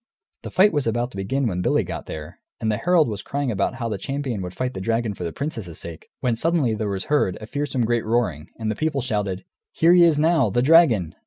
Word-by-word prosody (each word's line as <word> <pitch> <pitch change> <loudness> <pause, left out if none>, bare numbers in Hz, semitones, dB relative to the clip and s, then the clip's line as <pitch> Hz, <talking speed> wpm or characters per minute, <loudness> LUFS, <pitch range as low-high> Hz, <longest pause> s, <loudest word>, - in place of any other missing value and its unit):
The - - -7
fight 200 +3 +4
was 145 -5 0
about 120 +2 -1
to - - -10
begin 130 +8 -1
when 90 -6 -1
Billy - - +2
got - - -6
there, 75 -1 -8 0.2
and 110 - 0
the 105 - 0
herald 175 -1 +3
was 105 -3 -4
crying 140 -2 -2
out 125 - 0
how 120 -3 -3
the 105 -4 -3
champion 135 -4 -3
would 90 0 -6
fight 130 0 -2
the 95 - -5
dragon 115 +1 0
for 90 - -7
the 85 - -3
princess's 115 - -5
sake, 85 -1 -8
when 125 -3 +1
suddenly 155 -3 +1
there 105 -1 -2
was 95 -1 -2
heard 145 -12 +1
a 110 - -8
fearsome 140 0 -2
great 120 0 +1
roaring, 110 -10 -1
and 110 -1 -2
the - - -3
people 155 +1 -1
shouted, 105 -6 -2 0.3
"Here 165 +2 +5
he 180 -1 +7
is 165 -3 +4
now, 155 -6 +3
the 120 +5 +1
dragon!" 130 - +5
120 Hz, 245 wpm, -23 LUFS, 100-145 Hz, 0.3 s, he